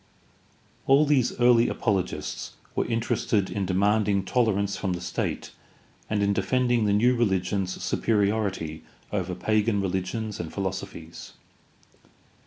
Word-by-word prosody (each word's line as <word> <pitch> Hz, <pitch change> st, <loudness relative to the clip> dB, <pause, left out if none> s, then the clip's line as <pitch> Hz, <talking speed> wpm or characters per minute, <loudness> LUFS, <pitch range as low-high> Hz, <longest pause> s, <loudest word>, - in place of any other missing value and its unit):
All 140 Hz, +3 st, +6 dB
these 140 Hz, -5 st, +1 dB
early 120 Hz, -1 st, +5 dB
apologists 100 Hz, -5 st, -2 dB, 0.2 s
were -, -, 0 dB
interested 115 Hz, -3 st, 0 dB
in 100 Hz, -2 st, -2 dB
demanding 100 Hz, +1 st, +2 dB
tolerance 100 Hz, -3 st, +1 dB
frorn 95 Hz, -3 st, -2 dB
the -, -, -5 dB
state 90 Hz, 0 st, -3 dB, 0.6 s
and 105 Hz, -1 st, +1 dB
in 100 Hz, 0 st, +2 dB
defending 120 Hz, +4 st, +1 dB
the 105 Hz, -, +2 dB
new 120 Hz, +5 st, +4 dB
reHgion's 95 Hz, -4 st, 0 dB
superiority 100 Hz, -7 st, 0 dB, 0.3 s
over 90 Hz, -3 st, -2 dB
pagan 110 Hz, +2 st, +1 dB
religions 95 Hz, +3 st, -2 dB
and 85 Hz, -2 st, -5 dB
philosophies. 95 Hz, -4 st, -6 dB
100 Hz, 115 wpm, -26 LUFS, 95-115 Hz, 0.6 s, All